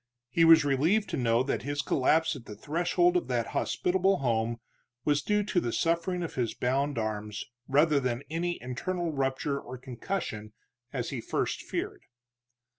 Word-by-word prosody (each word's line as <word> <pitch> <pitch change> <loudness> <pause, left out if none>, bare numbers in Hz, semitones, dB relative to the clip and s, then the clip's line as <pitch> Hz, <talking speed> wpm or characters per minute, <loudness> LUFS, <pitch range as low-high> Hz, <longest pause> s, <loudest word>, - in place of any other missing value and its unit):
He 165 - +3
was 165 -2 +8
relieved 160 +10 +2
to - - -1
know 120 -1 +2
that 135 - -1
his 145 +2 -2
collapse 160 +4 +2
at 125 -4 -10
the 105 - -8
threshold 175 - +1
of 355 - +1
that - - -1
hospitable 190 +2 +1
home 115 -2 0 0.5
was 145 -1 +3
due 210 +6 +1
to 200 -3 +1
the 120 - -2
suffering 170 +5 0
of 165 - -5
his 120 -3 -1
bound 135 +2 0
arms, 105 -1 -3 0.2
rather 145 +2 +4
than 125 -1 -2
any 170 +2 -2
internal 170 +7 -2
rupture 135 0 -1
or 130 - -8
concussion 120 - -5 0.4
as 125 -3 -3
he 135 - -3
at - - -10
first - - -1
feared. - - -4
140 Hz, 170 wpm, -29 LUFS, 125-170 Hz, 0.5 s, was